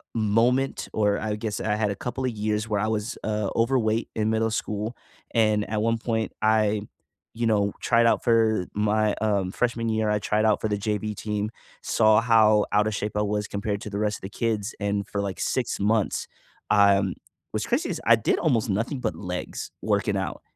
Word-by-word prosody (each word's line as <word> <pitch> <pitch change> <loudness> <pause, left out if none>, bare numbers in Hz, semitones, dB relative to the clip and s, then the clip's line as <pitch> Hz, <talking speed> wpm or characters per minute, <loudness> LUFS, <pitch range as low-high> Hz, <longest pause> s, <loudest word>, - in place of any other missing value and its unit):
moment 115 +5 +1
or 105 -2 +2
I 105 -1 -2
guess 105 -1 -4
I 105 -1 0
had 105 -1 0
a 100 - -3
couple 130 +4 -4
of 125 - 0
years 105 0 -2
where 105 -1 +1
I 110 - 0
was, 110 +1 -2
uh, 105 -2 -1
overweight 115 -2 +1
in 110 -1 0
middle 110 0 +1
school. 105 +2 -3 0.4
And 110 -2 +2
at 105 -1 -1
one 115 +1 +1
point, 110 -1 -2
I, 110 -1 +2 0.5
you 115 0 -1
know, 100 -2 +2
tried 115 0 +3
out 115 - +3
for 110 -5 +3
my, 105 0 +1
um, 100 -4 +1
freshman 115 +1 -1
year, 110 -1 +1
I 105 - +1
tried 105 +1 +1
out 105 -1 +2
for - - 0
the 105 - 0
JV 105 0 -2
team, 105 0 -2 0.3
saw 110 0 +4
how 110 -2 +4
out 105 +1 +3
of 110 - -1
shape 105 +1 -3
I 105 - +2
was 105 0 -1
compared 100 0 -3
to - - -6
the 100 - -4
rest 105 -1 0
of - - -22
the 95 - -6
kids. 110 0 -2
And 100 -1 -1
for, 100 - -4
like, 100 -2 -3
6 125 -5 -1
months, 105 +1 +1 0.4
um 100 -2 +4 0.4
what's 110 +1 -2
crazy 245 +7 0
is 165 -4 -3
I 115 - +7
did 110 - 0
almost 120 -9 +1
nothing 115 +7 -1
but - - -2
legs, 90 -2 -5
working 105 0 0
out, 95 -6 -4
110 Hz, 205 wpm, -25 LUFS, 105-115 Hz, 0.5 s, I